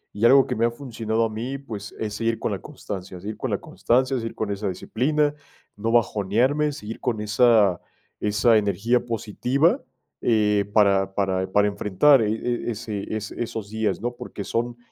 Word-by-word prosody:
Y 105 +3 +1
algo 135 +2 +7
que - - -3
me 115 - 0
ha - - 0
funcionado 115 -3 -2
a - - -2
mí, 120 +5 -4
pues, 110 -7 -8
es 105 -2 -3
seguir 115 +1 -1
con 110 - -2
la 100 - -3
constancia, 95 -10 -7
seguir 105 +4 -6
con - - -4
la - - 0
constancia, 130 +3 +1
seguir 115 -1 -5
con 105 -2 -2
esa 100 +1 -3
disciplina, 145 - 0 0.4
no 110 +2 -2
bajonearme, 120 +6 +2
seguir 115 -6 -7
con 115 -4 -1
esa 105 -4 +3 0.4
esa 105 +2 +3
energía 110 +4 +1
positiva, 125 - 0 0.4
eh, 105 -3 +2
para 100 -2 +3
para 95 -1 0
para 105 +1 +4
enfrentar, 105 +7 +4
eh 105 -1 +1
eh, 120 +2 -2
ese, 110 -2 -3
e 110 - -1 0.3
esos 110 -3 -6
días, 110 -2 -1
¿no? 120 +1 -3
Porque 100 - -7
son 120 +3 -2
110 Hz, 175 wpm, -24 LUFS, 105-120 Hz, 0.4 s, algo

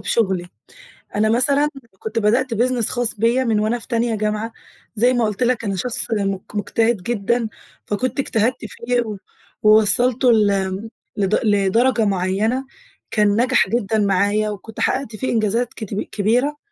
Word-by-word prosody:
بشُغلي. 190 -6 0 0.7
أنا 215 +1 +2
مثلًا 280 +5 +3 0.3
كنت 220 +1 -3
بدأت 235 +4 +1
business 240 0 +2
خاص 245 -2 -1
بيّا 235 +5 +2
من 225 -3 +1
وأنا 220 +3 0
في - - -13
تانية 235 -1 0
جامعة 215 +1 -2 0.4
زي 245 +4 +3
ما 240 -2 +1
قُلت 210 +3 -1
لك 245 -1 +1
أنا 195 -1 -1
شخص 230 +4 -2
مج 195 -3 0
مُجتهد 215 0 0
جدًا، 235 +1 -1 0.4
فكنت 245 +5 -2
اجتهدت 235 -2 +1
فيه 240 +3 -1
و 215 -4 -5 0.5
ووصّلته 230 +4 +4
لم 200 -1 +1 0.3
لد 200 0 +1
لدرجة 220 +3 +2
معيّنة 200 +7 0 0.5
كان 210 -1 +3 0.2
نجح 255 -6 +2
جدًا 220 -1 0
معايا 205 +2 +1
وكنت 210 +1 -8
حقّقت 260 -4 -1
فيه 260 +5 -2
إنجازات 225 +2 0
كتب 210 -2 -5
كبيرة 245 +8 0
220 Hz, 145 wpm, -20 LUFS, 205-240 Hz, 0.7 s, ووصّلته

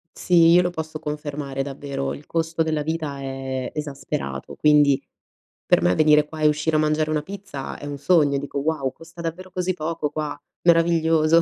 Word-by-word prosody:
Sì, 170 -2 +5
io 175 +1 +7
lo 180 - +1
posso 160 -2 -5
confermare 145 -2 -4
davvero, 135 -1 -4
il 145 - -10
costo 165 0 0
della 155 -1 -1
vita 155 -2 -3
è 135 -1 -4
esasperato, 135 - -5
quindi 150 -2 +4 0.7
per - - +4
me 90 +1 +3
venire 150 -1 +5
qua 155 0 -8
e 150 - +5
uscire 150 +1 +1
a 155 - +4
mangiare 155 0 +1
una 155 -1 0
pizza 185 -5 -7
è - - -8
un 145 -1 -5
sogno, 145 -2 +3
dico: 140 0 -4
"Wow, 140 -3 -1
costa 165 +1 -12
davvero 175 +3 -5
così 185 0 -1
poco 160 -2 -3
qua, 150 -1 -4 0.3
meraviglioso!" 165 -1 +4
155 Hz, 180 wpm, -23 LUFS, 140-165 Hz, 0.7 s, io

